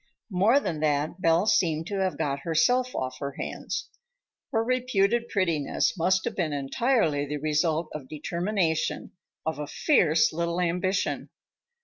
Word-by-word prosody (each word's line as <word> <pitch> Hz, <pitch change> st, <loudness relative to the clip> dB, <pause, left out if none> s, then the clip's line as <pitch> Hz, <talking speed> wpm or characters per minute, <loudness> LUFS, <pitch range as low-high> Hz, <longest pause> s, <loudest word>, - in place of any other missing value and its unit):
More 205 Hz, +9 st, +4 dB
than 165 Hz, -, -3 dB
that, 150 Hz, +3 st, 0 dB
Belle 165 Hz, +3 st, +3 dB
seemed 170 Hz, -7 st, +2 dB
to 200 Hz, +2 st, -3 dB
have 190 Hz, -1 st, 0 dB
got 140 Hz, -1 st, -1 dB
herself 245 Hz, -, +1 dB
off 130 Hz, 0 st, -3 dB
her 140 Hz, -1 st, -4 dB
hands. -, -, -5 dB, 0.6 s
Her 225 Hz, -1 st, +1 dB
reputed 240 Hz, -2 st, +1 dB
prettiness 165 Hz, -8 st, 0 dB
must 185 Hz, +2 st, +1 dB
have 235 Hz, -, -3 dB
been 165 Hz, -5 st, -1 dB
entirely 145 Hz, -, +1 dB
the 150 Hz, +1 st, -3 dB
result 155 Hz, +2 st, 0 dB
of 140 Hz, -4 st, -7 dB
determination, 170 Hz, +1 st, -1 dB, 0.3 s
of 160 Hz, -2 st, -2 dB
a 150 Hz, -, -4 dB
fierce 165 Hz, -, +3 dB
little 170 Hz, +1 st, -1 dB
ambition. 180 Hz, +2 st, -1 dB
170 Hz, 140 wpm, -27 LUFS, 155-200 Hz, 0.6 s, More